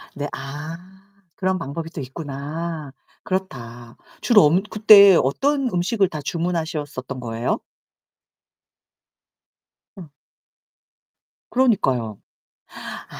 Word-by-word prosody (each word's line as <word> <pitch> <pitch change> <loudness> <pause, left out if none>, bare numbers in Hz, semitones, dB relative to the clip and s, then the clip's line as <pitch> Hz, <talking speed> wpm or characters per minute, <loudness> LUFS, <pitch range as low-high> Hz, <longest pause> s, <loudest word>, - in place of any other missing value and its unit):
네 145 0 -3
아 145 +5 -6 0.6
그런 185 0 -1
방법이 165 +1 -5
또 165 - -6
있구나. 145 +3 -6 0.3
그렇다. 120 -11 -5 0.3
주로 220 -5 +6
엄 175 +6 +3
그때 205 -3 +8
어떤 275 - 0
음식을 190 +3 +1
다 155 - -6
주문하셨었던 155 -5 -3
거예요? 115 -1 -2 2.4
어. 175 -6 -11 1.4
그러니까요. 135 - +1 0.6
아. - - -8
160 Hz, 185 characters per minute, -22 LUFS, 135-190 Hz, 2.4 s, 그때